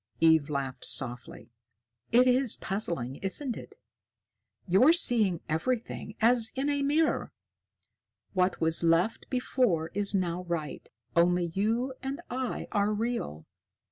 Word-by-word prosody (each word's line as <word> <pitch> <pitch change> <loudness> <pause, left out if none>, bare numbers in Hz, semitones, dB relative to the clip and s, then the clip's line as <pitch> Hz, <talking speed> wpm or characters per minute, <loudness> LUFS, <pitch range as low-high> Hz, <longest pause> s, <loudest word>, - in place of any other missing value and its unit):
Eve 160 -2 +4
laughed 135 -3 -4
softly. 125 -2 -3 0.6
"It 245 +2 +6
is 255 -1 +3
puzzling, 170 - -2
isn't 235 +6 -2
it? - - -11 0.9
You're 205 - +5
seeing 215 - +2
everything 215 +5 -3
as 230 0 +3
in 275 +2 0
a 285 0 0
mirror. 300 +3 +1 1.0
What 185 -1 +1
was 160 0 +3
left 170 +6 +1
before 245 -10 0
is 200 0 0
now 180 -2 -1
right. 165 -4 -5 0.3
Only 175 0 +2
you 230 +7 0
and 270 +3 -4
I 255 0 -3
are 205 0 +1
real. 210 - -3
200 Hz, 120 wpm, -29 LUFS, 165-250 Hz, 1.0 s, It